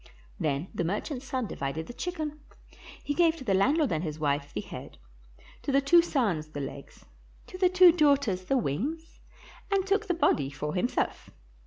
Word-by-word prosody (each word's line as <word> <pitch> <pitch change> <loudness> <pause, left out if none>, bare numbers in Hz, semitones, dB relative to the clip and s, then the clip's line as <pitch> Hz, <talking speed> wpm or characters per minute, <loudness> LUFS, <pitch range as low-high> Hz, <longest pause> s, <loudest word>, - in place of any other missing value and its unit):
Then 145 +3 -1
the - - -1
merchant's 245 - -3
son 255 -2 -2
divided 155 -3 -4
the 245 - -9
chicken. 310 -2 -4 0.6
He 290 - -1
gave 330 +1 +3
to 280 - -9
the 205 -6 +1
landlord 280 - +3
and 155 +1 -1
his 155 -3 -4
wife 145 -1 -1
the - - -3
head, - - -10 0.6
to - - -2
the 275 - +4
two 335 +5 +6
sons 215 - 0
the 155 -1 -7
legs, 140 0 -8 0.4
to 370 - -10
the 365 -1 +4
two 365 -1 +7
daughters 280 - +2
the 270 - +1
wings, 265 - -3 0.5
and 390 -1 +2
took 405 +2 +1
the 355 - +1
body 145 - +2
for 150 +1 -4
himself. 190 +7 -1
260 Hz, 180 wpm, -28 LUFS, -, 0.6 s, two